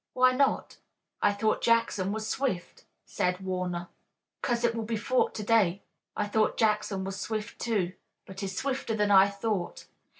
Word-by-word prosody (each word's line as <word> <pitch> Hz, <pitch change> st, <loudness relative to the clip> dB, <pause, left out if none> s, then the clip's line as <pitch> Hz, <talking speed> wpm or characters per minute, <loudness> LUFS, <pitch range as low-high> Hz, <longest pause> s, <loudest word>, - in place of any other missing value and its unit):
"Why 255 Hz, 0 st, +5 dB
not? 270 Hz, +2 st, +1 dB, 0.4 s
I 205 Hz, -, +4 dB
thought 215 Hz, +2 st, 0 dB
Jackson 230 Hz, -4 st, +2 dB
was 215 Hz, +1 st, -3 dB
swift," 215 Hz, -8 st, -3 dB, 0.2 s
said 180 Hz, 0 st, -1 dB
Warner. 180 Hz, -2 st, -3 dB, 0.5 s
"Cause 240 Hz, -1 st, 0 dB
it 235 Hz, -1 st, +3 dB
will 230 Hz, -, -3 dB
be 225 Hz, +1 st, -2 dB
fought 250 Hz, +4 st, +1 dB
to 215 Hz, -, -4 dB
day. 205 Hz, -4 st, +2 dB, 0.3 s
I 210 Hz, -, +1 dB
thought 215 Hz, +1 st, +1 dB
Jackson 210 Hz, -3 st, +1 dB
was 195 Hz, 0 st, -5 dB
swift, 220 Hz, 0 st, -4 dB
too, 200 Hz, -6 st, 0 dB, 0.3 s
but 190 Hz, 0 st, -10 dB
he's 190 Hz, -1 st, -4 dB
swifter 265 Hz, -4 st, -1 dB
than 210 Hz, -1 st, +1 dB
I 195 Hz, 0 st, +7 dB
thought. 200 Hz, -3 st, -3 dB
210 Hz, 165 wpm, -29 LUFS, 190-230 Hz, 0.5 s, I